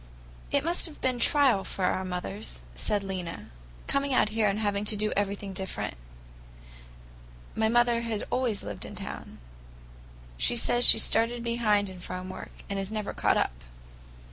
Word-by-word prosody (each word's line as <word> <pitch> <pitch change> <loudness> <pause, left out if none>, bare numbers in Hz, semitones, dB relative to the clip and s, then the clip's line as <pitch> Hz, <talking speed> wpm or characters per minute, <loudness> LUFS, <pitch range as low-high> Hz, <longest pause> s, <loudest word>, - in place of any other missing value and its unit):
"It 285 -1 +1
must 340 +2 +2
have 310 - -12
been 255 -1 0
a - - -8
trial 255 -6 +4
for 190 - -3
our 185 - +1
mothers," 180 - -5
said 200 - 0
Lena, 185 - -5 0.3
"coming 275 -1 0
out 215 - +4
here 215 0 +1
and 200 0 +1
having 205 -1 0
to 210 - +3
do 215 +1 0
everything 200 -1 -2
different. 190 0 -4 1.6
My 220 0 +2
mother 240 0 +3
had 230 -3 -3
always 240 -5 0
lived 105 -2 -5
in - - -8
town. - - -7 1.0
She - - +3
says 240 +1 +4
she - - +10
started 230 +2 +2
behind 220 -4 +1
in 185 -1 -9
farm 185 +1 -6
work, - - -7 0.2
and 200 0 -3
never 215 -2 -3
has - - -12
caught - - +4
up." - - -1
210 Hz, 170 wpm, -28 LUFS, 195-235 Hz, 1.6 s, she